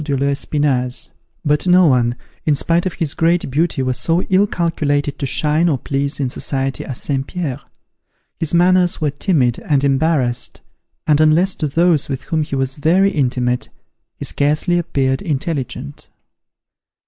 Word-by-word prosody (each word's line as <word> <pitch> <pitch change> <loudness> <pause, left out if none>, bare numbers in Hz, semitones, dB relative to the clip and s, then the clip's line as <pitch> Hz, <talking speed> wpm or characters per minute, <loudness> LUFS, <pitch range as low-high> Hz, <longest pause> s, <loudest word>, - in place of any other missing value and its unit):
de 140 -2 -1
l'Espinasse. 140 -2 -1 0.4
But 150 +4 +1
no 180 0 +6
one, 120 -5 +2 0.3
in 150 - +2
spite 170 +5 +1
of 180 - -4
his 155 -4 -2
great 170 -3 +1
beauty, 155 -1 0
was 130 -1 -1
so 170 +2 +1
ill 195 +2 +4
calculated 145 -6 -1
to 140 - -2
shine 155 +5 +2
or 145 - +1
please 140 +3 -2
in 135 - 0
society 135 +1 -2
as 130 - -5
St. 135 -2 -2
Pierre. 150 -7 -4 0.8
His 160 - -2
manners 180 +1 +3
were 150 -2 0
timid 140 - +1
and 140 -3 0
embarrassed, 135 -3 0 0.4
and, 150 -1 +3
unless 165 +5 +3
to 155 - -1
those 165 0 +2
with 135 -2 -4
whom 160 -1 -1
he 150 -2 -3
was 135 +1 -2
very 180 +7 +3
intimate, 125 -5 -1 0.5
he - - -5
scarcely 150 +5 +1
appeared 135 -6 -1
intelligent. 145 -4 -4
145 Hz, 155 wpm, -18 LUFS, 135-165 Hz, 0.8 s, no